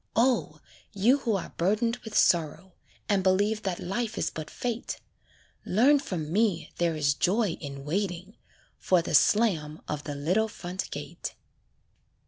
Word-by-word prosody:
O! 245 +2 +2 0.3
you 230 +8 +4
who 230 -6 0
are 190 - -4
burdened 215 +7 +1
with 220 -3 -5
sorrow, 170 +2 +2 0.3
And 200 -3 +2
believe 205 +3 +2
that 190 -4 -3
life 220 +4 -3
is - - 0
but 155 -1 -6
fate, 240 -1 -4 0.6
Learn 265 +9 +4
from 165 - -4
me 205 -5 +1
there 170 -2 +1
is 145 -2 +2
joy 205 +8 +1
in 140 -2 -7
waiting 185 +4 -3 0.4
For 180 -3 +3
the - - -4
slam 165 -9 +3
of 150 -1 -4
the 145 -1 -4
little 180 +10 +1
front 185 -3 -6
gate. - - -6
190 Hz, 145 wpm, -28 LUFS, 165-220 Hz, 0.6 s, you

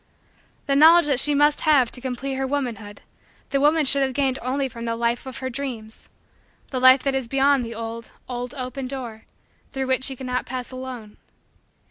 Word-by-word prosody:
The 275 - +1
knowledge 325 +4 +7
that 280 -4 +2
she 295 +1 +3
must 295 +1 +3
have 280 -6 +3
to 250 - -11
complete 260 +1 -4
her 265 0 -2
womanhood 230 -7 -4 0.5
the 275 -1 +1
woman 300 +1 +3
should 275 +1 +3
have 265 -1 0
gained 270 -2 0
only 270 +3 -1
from 235 -2 -8
the 230 0 -1
life 235 +2 -1
of 260 - -7
her 260 - -4
dreams 235 -5 -7 0.6
the 260 - -1
life 260 +1 +6
that 275 - 0
is 265 -3 -2
beyond 275 +1 +2
that 230 0 -7
old, 230 0 -6 0.2
old, 250 +2 -5
open 255 0 -5
door 245 -5 -7 0.5
through 270 -1 -2
which 260 0 +1
she 270 - -1
could 260 - -9
not 250 0 -2
pass 250 0 -5
alone. 255 -5 -8
260 Hz, 195 wpm, -23 LUFS, 240-275 Hz, 0.6 s, knowledge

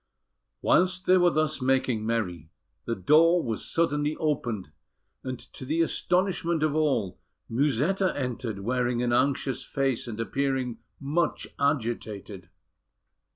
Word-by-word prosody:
Whilst 185 0 +3
they 185 0 +5
were 175 0 +5
thus 155 -3 0
making 130 -4 +1
merry, 90 -9 -2 0.4
the 115 - -1
door 165 - +4
was 115 -2 -3
suddenly 150 -2 +1
opened; 120 - -2 0.5
and 130 -1 -4
to - - -11
the 155 +6 0
astonishment 175 -2 0
of 155 -2 +2
all, 135 - 0 0.3
Musetta 150 - +1
entered, 120 -6 -3
wearing 120 +2 0
an 120 -1 +1
anxious 135 0 +1
face, 135 -4 -1
and 115 -2 -6
appearing 130 -1 -1 0.2
much 150 +4 -1
agitated. 110 - -2
135 Hz, 120 wpm, -27 LUFS, 115-155 Hz, 0.5 s, they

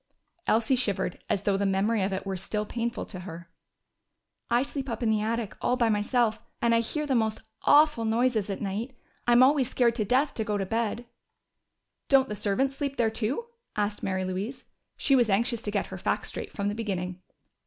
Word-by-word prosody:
Elsie 225 +4 +3
shivered, 200 -7 -1
as 200 - 0
though 200 -1 +2
the 200 - 0
memory 200 +3 +1
of 190 +1 0
it 190 0 -3
were 195 -1 -2
still 210 +3 -3
painful 235 +2 -3
to 185 - -7
her. 170 -2 -9 1.0
"I 240 +2 +3
sleep 275 -1 -5
up 230 +1 -3
in 220 - +3
the 215 -1 +2
attic, 225 -1 -2
all 250 - +1
by 235 -3 +3
myself. 220 +2 +1 0.2
And 235 0 +3
I 230 - +5
hear 300 +6 -2
the 280 - 0
most 220 -3 +1 0.2
awful 295 -5 +5
noises 225 -2 +1
all 195 - -2
night. 215 +6 -4 0.3
I'm 240 +1 +7
always 265 -2 +4
scared 240 -3 +3
to 230 -2 -1
death 260 +7 +2
to 220 - -2
go 210 -1 -1
to 195 - -1
bed." 230 +3 -1 1.0
"Don't 270 -1 +5
the - - -2
servants 210 +7 0
sleep 280 -1 -3
there 225 -2 +2
too?" 230 - -2 0.3
asked 205 0 -1
Mary 190 -1 -1
Louise. 195 +8 -4 0.3
She 275 - +3
was 240 -4 +3
anxious 230 +3 +2
to 215 - -3
get 205 -1 0
her - - -6
facts - - -1
straight - - -6
from 200 -1 -2
the 205 - 0
beginning. 185 -4 -3
225 Hz, 205 wpm, -28 LUFS, 200-245 Hz, 1.0 s, I'm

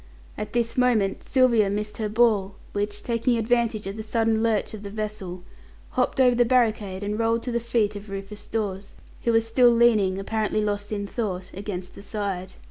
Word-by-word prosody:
At 210 0 -6
this 235 0 0
moment 225 -6 +2
Sylvia 240 -6 +3
missed 210 +1 -3
her 215 -2 -2
ball, 210 -3 +2 0.2
which, 205 0 -3
taking 235 +1 +1
advantage 230 -2 +1
of 195 +3 -5
a - - -2
sudden 225 0 +1
lurch 225 -2 +1
of 215 - -7
the 200 - -7
vessel, 200 -4 -5 0.5
hopped 255 +1 0
over 250 -1 +6
the 240 0 +4
barricade, 220 -6 +1
and 210 +2 -2
rolled 230 0 +1
to 250 - -3
the 235 - +1
feet 230 -3 0
of 205 0 -8
Rufus 195 +1 -7
Dawes, 200 -3 -3 0.3
who 235 - +4
was 225 0 +3
still 240 +2 +5
leaning, 225 -5 +4
apparently 215 +1 -1
lost 205 0 -2
in 205 -1 -2
thought, 195 -4 -4
against 185 -2 -6
the - - -11
side. 195 -3 -4
215 Hz, 190 wpm, -25 LUFS, 200-230 Hz, 0.5 s, over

